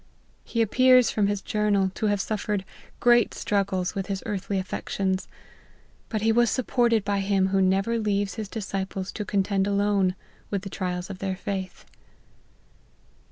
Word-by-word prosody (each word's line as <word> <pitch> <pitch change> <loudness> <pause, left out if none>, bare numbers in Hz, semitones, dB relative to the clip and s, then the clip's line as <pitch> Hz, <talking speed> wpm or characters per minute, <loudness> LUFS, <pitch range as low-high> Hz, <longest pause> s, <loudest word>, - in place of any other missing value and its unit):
He 230 -1 0
appears, 255 +2 +5
from 205 -2 +1
his 205 -1 -2
Journal, 205 -3 +1
to 215 - -1
have 205 -1 +1
suf 210 +2 -3
:'ered 205 -3 0 0.4
great 240 -1 +4
struggles 195 -3 0
with 195 -1 -3
his 195 -2 -3
earthly 200 0 -2
affections: 190 0 -2 0.8
but 215 -2 -2
he 225 - +4
was 240 +1 +4
supported 235 -3 +1
by 200 -1 0
Him 195 -1 +1
who 195 0 +2
never 195 +5 +2
leaves 205 -2 0
his 215 -3 -5
disciples 195 -2 -4
to 210 - -4
contend 195 0 0
alone 200 -2 +2 0.3
with 200 -2 -2
the 195 - -7
trials 180 -1 -3
of 190 - -8
their 190 -1 -2
faith. 190 -1 -5
200 Hz, 160 wpm, -26 LUFS, 190-215 Hz, 0.8 s, appears